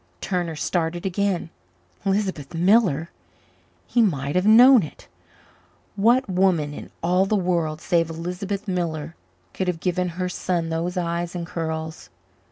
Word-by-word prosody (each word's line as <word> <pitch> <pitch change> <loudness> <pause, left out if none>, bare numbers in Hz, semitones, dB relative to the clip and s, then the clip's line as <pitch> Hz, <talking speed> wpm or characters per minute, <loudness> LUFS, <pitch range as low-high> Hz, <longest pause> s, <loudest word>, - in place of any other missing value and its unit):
Turner 175 -4 -2
started 170 +2 -2
again. 190 -3 -1 0.5
Lisbeth 190 -7 -1
Miller! 175 -3 +3 0.7
He 240 - +2
might 145 -9 0
have 180 +3 +2
known 245 +3 +8
it. 155 - -9 0.9
What 235 +6 +3
woman 180 -6 +1
in - - -9
all 180 +3 +2
the 215 - +1
world 170 -5 0
save 165 -3 +1
Lisbeth 180 +5 -4
Miller 165 -3 -3 0.4
could 190 - -2
have 175 -2 -1
given 180 0 0
her 185 0 -1
son 175 -2 -2
those 170 +3 -2
eyes 170 0 -2
and 170 -1 -3
curls? 160 -2 -5
175 Hz, 135 wpm, -23 LUFS, 165-195 Hz, 0.9 s, known